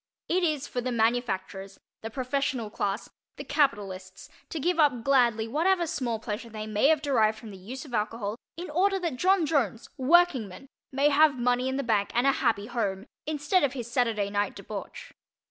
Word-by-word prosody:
It 365 Hz, +2 st, +1 dB
is 305 Hz, -5 st, 0 dB
for 245 Hz, -, -3 dB
the 255 Hz, +1 st, -2 dB
manufacturers, 205 Hz, -5 st, -1 dB, 0.2 s
the 225 Hz, -, -5 dB
professional 255 Hz, -2 st, -2 dB
class, 200 Hz, -1 st, -3 dB, 0.3 s
the -, -, -6 dB
capitalists 195 Hz, -9 st, -1 dB, 0.2 s
to 320 Hz, -, -4 dB
give 345 Hz, +3 st, 0 dB
up 265 Hz, -7 st, +3 dB
gladly 240 Hz, -5 st, +3 dB
whatever 340 Hz, +8 st, +2 dB
small 255 Hz, -8 st, -2 dB
pleasure 220 Hz, +1 st, -5 dB
they 215 Hz, -1 st, -6 dB
may 215 Hz, +4 st, +2 dB
have 310 Hz, -1 st, +3 dB
derived 220 Hz, -6 st, +2 dB
from 220 Hz, -1 st, -10 dB
the 195 Hz, -, -10 dB
use 250 Hz, +10 st, -8 dB
of 265 Hz, -, -12 dB
alcohol, 210 Hz, -1 st, -2 dB, 0.2 s
in 350 Hz, -2 st, -6 dB
order 385 Hz, +5 st, +2 dB
that 340 Hz, -8 st, -3 dB
John 370 Hz, +3 st, +3 dB
Jones, 265 Hz, -7 st, -1 dB
workingman, 270 Hz, -, +2 dB, 0.2 s
may 280 Hz, +2 st, +3 dB
have 295 Hz, -1 st, +4 dB
money 245 Hz, +1 st, +1 dB
in 265 Hz, -, -2 dB
the 275 Hz, -, -1 dB
bank 215 Hz, -4 st, +1 dB
and 240 Hz, +2 st, +3 dB
a 275 Hz, -, +6 dB
happy 205 Hz, -6 st, 0 dB
home, 210 Hz, -4 st, -2 dB, 0.2 s
instead 305 Hz, +4 st, +1 dB
of 280 Hz, -2 st, +1 dB
his 240 Hz, -3 st, -6 dB
Saturday 225 Hz, -5 st, 0 dB
night 205 Hz, 0 st, -1 dB
debauch. -, -, -8 dB
245 Hz, 185 wpm, -27 LUFS, 215-290 Hz, 0.3 s, a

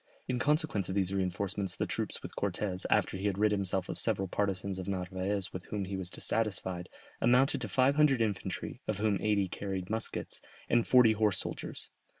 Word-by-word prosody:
In 125 Hz, -1 st, 0 dB
consequence 150 Hz, -, +1 dB
of 95 Hz, -, -2 dB
these 95 Hz, -1 st, +1 dB
reinforcements 95 Hz, 0 st, -1 dB
the -, -, -1 dB
troops -, -, -3 dB
with -, -, -8 dB
Cortès, 95 Hz, -1 st, -2 dB
after -, -, +2 dB
he 100 Hz, +2 st, -1 dB
had 100 Hz, -2 st, -1 dB
rid 105 Hz, +1 st, +3 dB
himself 95 Hz, -2 st, 0 dB
of -, -, -3 dB
several 95 Hz, -, +1 dB
partisans 95 Hz, 0 st, -1 dB
of 95 Hz, -, -5 dB
Narvaez 95 Hz, +1 st, -2 dB
with 90 Hz, -1 st, -6 dB
whom 100 Hz, -2 st, -3 dB
he 95 Hz, +1 st, -4 dB
was 95 Hz, -2 st, -3 dB
dissatisfied, 95 Hz, -5 st, -2 dB, 0.3 s
amounted 125 Hz, +3 st, +4 dB
to -, -, -2 dB
five 135 Hz, +2 st, +3 dB
hundred 150 Hz, -4 st, +5 dB
infantry, 105 Hz, -4 st, -2 dB
of 110 Hz, -, 0 dB
whom 105 Hz, -1 st, +1 dB
eighty 105 Hz, -2 st, +2 dB
carried 95 Hz, 0 st, -4 dB
muskets, 110 Hz, 0 st, -4 dB, 0.3 s
and 120 Hz, -1 st, +3 dB
forty 125 Hz, -3 st, +7 dB
horse 105 Hz, -3 st, +2 dB
soldiers. -, -, -6 dB
100 Hz, 185 wpm, -31 LUFS, 95-110 Hz, 0.3 s, forty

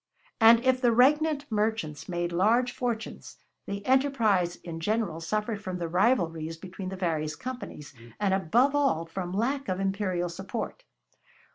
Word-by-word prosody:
And 230 Hz, +2 st, +7 dB
if 255 Hz, 0 st, +3 dB
the 240 Hz, -2 st, +4 dB
regnant 290 Hz, +4 st, +3 dB
merchants 210 Hz, -9 st, -1 dB
made 175 Hz, -1 st, -2 dB
large 225 Hz, +8 st, +3 dB
fortunes, 235 Hz, -3 st, -4 dB, 0.3 s
the 200 Hz, 0 st, -5 dB
enterprise 230 Hz, -10 st, +2 dB
in 165 Hz, -2 st, -8 dB
general 210 Hz, -2 st, -1 dB
suffered 210 Hz, +4 st, -2 dB
from 185 Hz, -3 st, -4 dB
the 170 Hz, -1 st, -3 dB
rivalries 165 Hz, -4 st, +1 dB
between 185 Hz, +2 st, -7 dB
the 190 Hz, -, -5 dB
various 160 Hz, -4 st, -1 dB
companies, 250 Hz, -, -7 dB, 0.3 s
and 200 Hz, -2 st, +1 dB
above 230 Hz, -, +3 dB
all 275 Hz, -, +1 dB
from 175 Hz, +1 st, -5 dB
lack 265 Hz, +8 st, -1 dB
of 185 Hz, 0 st, -1 dB
imperial 195 Hz, -3 st, -1 dB
support. 195 Hz, -, -6 dB
200 Hz, 145 wpm, -28 LUFS, 175-245 Hz, 0.3 s, And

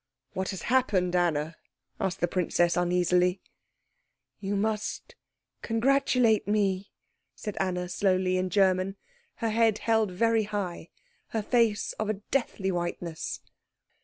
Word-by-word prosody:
"What 190 Hz, 0 st, -2 dB
has 190 Hz, -4 st, -5 dB
happened, 200 Hz, -8 st, +2 dB
Anna?" 165 Hz, -2 st, 0 dB, 0.4 s
asked 190 Hz, 0 st, -2 dB
the 175 Hz, -, +3 dB
princess 175 Hz, -1 st, +1 dB
uneasily. 180 Hz, +1 st, +2 dB, 1.0 s
"You 200 Hz, 0 st, -2 dB
must 210 Hz, +1 st, -2 dB, 0.5 s
congratulate 245 Hz, -2 st, +2 dB
me," 200 Hz, -2 st, +1 dB, 0.5 s
said 210 Hz, -3 st, -6 dB
Anna 180 Hz, -2 st, -1 dB
slowly 185 Hz, -1 st, +1 dB
in 185 Hz, 0 st, 0 dB
German, 190 Hz, -1 st, +2 dB, 0.4 s
her 230 Hz, -2 st, -1 dB
head 225 Hz, -1 st, +3 dB
held 220 Hz, -2 st, +2 dB
very 225 Hz, +4 st, +2 dB
high, 195 Hz, -5 st, -4 dB, 0.4 s
her 220 Hz, -2 st, -2 dB
face 230 Hz, -2 st, +2 dB
of 215 Hz, -1 st, -1 dB
a 215 Hz, -, +1 dB, 0.2 s
deathly 210 Hz, -7 st, 0 dB
whiteness. 175 Hz, -2 st, -4 dB
195 Hz, 120 wpm, -28 LUFS, 180-220 Hz, 1.0 s, the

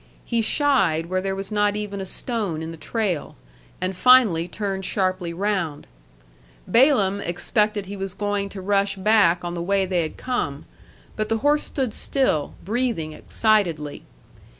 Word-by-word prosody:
He 235 Hz, -1 st, 0 dB
shied 225 Hz, -, +2 dB
where 185 Hz, 0 st, +1 dB
there 195 Hz, 0 st, -2 dB
was 195 Hz, +1 st, -6 dB
not 205 Hz, -1 st, +2 dB
even 205 Hz, -2 st, -4 dB
a 190 Hz, -, -5 dB
stone 200 Hz, -9 st, -3 dB
in 160 Hz, -, -5 dB
the -, -, -8 dB
trail, 185 Hz, -2 st, -2 dB, 0.4 s
and 185 Hz, +1 st, -2 dB
finally 215 Hz, -7 st, +5 dB
turned 195 Hz, 0 st, -4 dB
sharply 185 Hz, -2 st, -1 dB
round. 175 Hz, -5 st, -2 dB, 0.8 s
Balaam 205 Hz, -3 st, +4 dB
expected 205 Hz, +4 st, 0 dB
he 200 Hz, +2 st, -7 dB
was 195 Hz, -1 st, -4 dB
going 205 Hz, -1 st, -2 dB
to 195 Hz, -1 st, -8 dB
rush 200 Hz, 0 st, +1 dB
back 190 Hz, -4 st, +3 dB
on 175 Hz, -, -3 dB
the 170 Hz, -, -4 dB
way 195 Hz, +2 st, +1 dB
they 180 Hz, -2 st, 0 dB
had 155 Hz, -, -5 dB
come; 150 Hz, -, -3 dB, 0.5 s
but 215 Hz, 0 st, -2 dB
the 225 Hz, -, +1 dB
horse 295 Hz, +1 st, +4 dB
stood 260 Hz, -6 st, -2 dB
still, 255 Hz, -, 0 dB
breathing 220 Hz, -8 st, -1 dB
excitedly. 170 Hz, -9 st, 0 dB
195 Hz, 155 wpm, -23 LUFS, 175-215 Hz, 0.8 s, finally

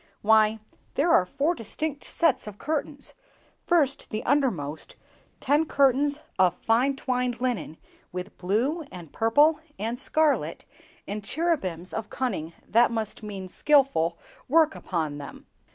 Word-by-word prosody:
"Why, 220 Hz, 0 st, +5 dB, 0.4 s
there 315 Hz, +5 st, +2 dB
are 185 Hz, -, +5 dB
four 295 Hz, -, 0 dB
distinct 290 Hz, -, -5 dB
sets 300 Hz, -9 st, +1 dB
of 205 Hz, -1 st, -8 dB
curtains! 295 Hz, 0 st, -3 dB, 0.5 s
First, 290 Hz, -6 st, +2 dB
the 215 Hz, -, -3 dB
undermost, 195 Hz, -, -1 dB, 0.4 s
ten 295 Hz, +4 st, +2 dB
curtains 280 Hz, 0 st, +3 dB, 0.2 s
of 180 Hz, -2 st, +4 dB
fine 250 Hz, +5 st, +2 dB
twined 250 Hz, -3 st, -1 dB
linen, 245 Hz, -10 st, -2 dB, 0.3 s
with 180 Hz, +2 st, -6 dB
blue, 235 Hz, -, 0 dB
and 175 Hz, -4 st, -10 dB
purple, 290 Hz, +8 st, +4 dB, 0.2 s
and 230 Hz, +4 st, -3 dB
scarlet, 305 Hz, +2 st, +1 dB, 0.4 s
and 205 Hz, 0 st, -4 dB
cherubims 200 Hz, -, -1 dB
of 220 Hz, -1 st, -4 dB
cunning—that 230 Hz, -, 0 dB
must 225 Hz, -2 st, -3 dB
mean 200 Hz, -3 st, -6 dB
skilful—work 275 Hz, -, +2 dB
upon 155 Hz, -5 st, -3 dB
them!" 140 Hz, -, -10 dB
240 Hz, 120 wpm, -26 LUFS, 195-285 Hz, 0.5 s, Why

